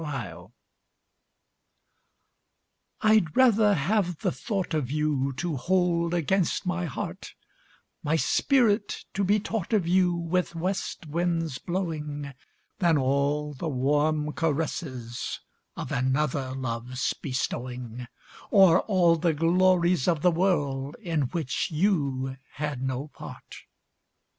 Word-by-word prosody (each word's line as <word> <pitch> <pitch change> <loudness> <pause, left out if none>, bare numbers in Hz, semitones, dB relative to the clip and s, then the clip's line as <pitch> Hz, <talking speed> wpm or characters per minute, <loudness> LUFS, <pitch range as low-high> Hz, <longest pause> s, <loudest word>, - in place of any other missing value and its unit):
Choice 90 - -6 2.5
I'D 215 -5 +4
rather 220 -5 +5
have 180 +2 0
the - - +1
thought 190 - -3
of 150 -5 0
youTo 150 +2 -1
hold 175 +2 +1
against 180 +3 0
my 180 0 -1
heart, 150 - -6 0.7
My 150 +2 0
spirit 215 - +2
to 200 - 0
be 205 +3 +3
taught 215 0 -3
of 210 -4 +3
youWith 175 0 +1
west 185 +1 -3
winds 165 -2 -1
blowing, 150 -6 -4 0.5
Than 170 -5 +3
all 140 +2 0
the 155 +4 -4
warm 150 +3 +1
caressesOf 140 -6 -3 0.4
another 130 +1 -1
love's 125 0 -2
bestowing, 125 -2 -4 0.4
Or 190 -3 +6
all 175 -5 +3
the 165 0 +1
glories 175 0 +3
of 165 -4 +1
the 180 - +5
worldIn 150 - -1
which 155 -2 -2
you 140 -7 0 0.2
had 145 -4 -3
no 130 +2 -3
part. - - -11
160 Hz, 105 wpm, -27 LUFS, 135-180 Hz, 2.5 s, Or